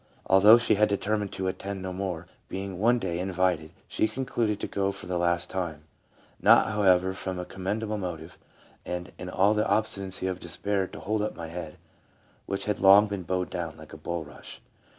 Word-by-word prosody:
Although 105 +4 +7
she 115 -1 +2
had 105 - +5
determined 105 0 -1
to 95 -1 -3
attend 95 +1 -4
no 95 0 -4
more, 90 -3 -4 0.2
being 95 -1 -5
one 120 +4 +4
day 90 -6 -3
invited, 90 -4 0 0.2
she - - +1
concluded 115 -4 -2
to - - -2
go 100 0 -1
for 100 - -9
the 90 0 -2
last 85 0 +2
time, 85 -5 -4 0.6
not, - - +6
however, 95 -3 +3
from 95 -1 -5
a 90 - -4
com 95 0 -10
mendable 105 +1 -1
motive, 85 -3 -6 0.4
and 90 0 -5
" - - -33
in 90 - -6
all 100 +3 +3
the 105 -1 +1
obstinacy 100 -2 +1
of 95 -1 -2
despair 95 +3 0
to - - -10
hold 110 +1 -1
up 105 - -2
my 80 -1 -7
head, 90 +1 -7 0.7
which 95 0 -3
had 105 -1 -1
long 100 +2 +8
been 100 -2 -4
bowed 90 +1 -2
down, 85 -2 -4
like 80 0 -13
a - - -8
bulrush." 80 -1 -7
95 Hz, 195 wpm, -27 LUFS, 90-100 Hz, 0.7 s, long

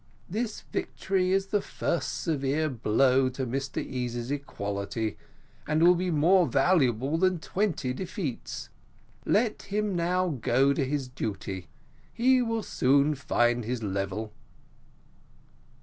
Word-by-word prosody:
This 220 +4 -3
victory 185 -1 -1
is 195 0 +2
the 205 - +3
first 170 - -2
severe 155 0 0
blow 130 +2 +3
to 130 +1 -4
Mr 135 +3 -3
Easy's 120 -1 -3
equality, 110 -5 -3 0.5
and 155 +2 +2
will 175 +1 +8
be 180 +1 -1
more 170 +3 +4
valuable 135 0 +2
than 185 0 +3
twenty 165 -7 -1
defeats. 175 - -5 0.6
Let 215 +1 +2
him 205 -1 -2
now 180 +2 +1
go 135 0 +2
to 140 - 0
his 135 0 -2
duty: 100 -7 -5 0.4
he 255 +2 +3
will 225 -2 -1
soon 140 +1 +3
find 120 -3 +1
his 120 +1 -3
level." 100 +2 -3
140 Hz, 120 wpm, -28 LUFS, 120-185 Hz, 0.6 s, will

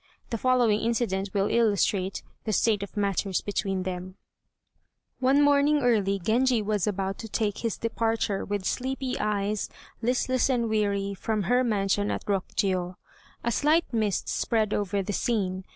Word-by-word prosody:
The 230 - 0
following 245 -4 +3
incident 220 -4 0
will 195 0 +1
illustrate 200 -4 +1 0.2
the 215 - -1
state 210 +1 +2
of 200 +1 -7
matters 200 -1 0
between 195 -2 -2
them: 185 0 -5 1.0
One 270 +3 +4
morning 290 0 +4
early 205 -5 +2
Genji 235 +6 +2
was 210 -1 0
about 195 -1 -2
to 225 - -6
take 205 -1 -1
his 230 -2 -2
departure, 225 -3 -1
with 205 -2 -3
sleepy 260 +2 -2
eyes, 210 -1 -1 0.3
listless 255 +2 +1
and 235 -3 +1
weary, 200 -2 0
from 210 +1 -2
her 245 +4 +3
mansion 205 -3 +1
at - - -3
Rokjiô. 185 -2 -1 0.5
A 235 - 0
slight 305 +5 +2
mist 215 -4 0
spread 220 -3 0
over 200 -1 0
the 205 - -3
scene. 190 -5 -1
210 Hz, 150 wpm, -27 LUFS, 195-235 Hz, 1.0 s, One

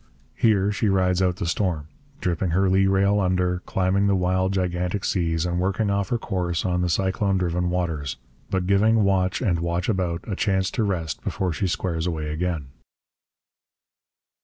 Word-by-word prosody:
Here 105 -3 +2
she 105 +1 0
rides 95 -1 +2
out 90 -1 +2
the 90 - -4
storm, 85 -3 -1 0.4
dipping 90 0 0
her 95 +4 +2
lee 95 +1 +3
rail 100 +1 +3
under, 90 -1 +1
climbing 95 +2 +1
the 100 - +3
wild, 95 +1 +1
gigantic 90 +1 -1
seas, 80 -3 0
and 90 0 -1
working 100 +3 0
off 100 -1 0
her 120 - +1
course 90 -6 -2
on 90 -1 0
the 90 - 0
cyclone 95 +3 +1
driven 90 -1 0
waters; 80 -7 -2 0.3
but 95 -2 -1
giving 105 +3 +3
watch 95 0 +1
and 90 -7 +1
watch 85 +1 -1
about 90 -5 -1
a 100 - -2
chance 95 -2 0
to 115 - 0
rest 85 -7 -2
before 90 -3 -1
she 95 +5 -1
squares 85 -2 -2
away 80 -3 -3
again. 80 -3 -2
90 Hz, 170 wpm, -24 LUFS, 85-95 Hz, 0.4 s, lee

